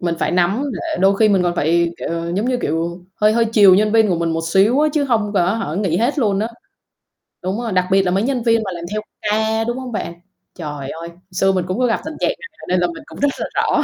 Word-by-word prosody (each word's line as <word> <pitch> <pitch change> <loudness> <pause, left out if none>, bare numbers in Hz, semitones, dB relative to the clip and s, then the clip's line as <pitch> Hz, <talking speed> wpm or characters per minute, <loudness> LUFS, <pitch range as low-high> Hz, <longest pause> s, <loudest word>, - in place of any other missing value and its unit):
mình 170 -1 -1
phải - - 0
nắm, 185 +9 +1
để 320 -2 -4
đôi 195 +1 +4
khi 220 0 +4
mình 195 -3 +3
còn 175 -1 0
phải, 170 +2 +2
kiểu, - - -5 0.3
giống 210 +5 0
như, 255 -1 +1
kiểu, 170 +3 -2 0.2
hơi 210 +1 +5
hơi 230 0 +3
chiều 210 -4 +6
nhân 210 +2 +2
viên 225 -1 +4
của 180 - +1
mình 170 -1 0
một 165 0 -1
xíu 205 - +4
á, 305 - +4
chứ 295 -2 +1
hông 220 -5 0
có 185 +1 +2
hả, 195 -9 -3
nghỉ 185 -4 0
hết 250 +8 0
luôn 205 -6 +1
á. 220 +2 -1 0.9
Đúng 190 +5 -2
rồi, 230 -3 -3
đặc 185 0 +2
biệt 195 0 +5
là 180 - 0
mấy 195 +3 +1
nhân 255 -2 -1
viên 230 -1 +3
mà 190 - -4
làm 170 - -7
theo 215 0 -2 0.2
ca, 220 +1 0
đúng 240 +2 -2
hông 255 -2 -6
bạn? 190 -5 -4 0.4
Trời 145 -5 -6
ơi, 165 +2 -7 0.2
xưa 195 +1 +2
mình 185 -2 -1
cũng 185 +7 -2
có 250 - +3
gặp 230 - +1
tình 315 0 -6
trạng - - +1
này 465 - -12
nên 185 0 +2
là 175 - +2
mình 170 - -8
cũng - - -12
rất 285 - +3
là - - -2
rõ. 300 - +2
200 Hz, 275 wpm, -19 LUFS, 175-230 Hz, 0.9 s, chiều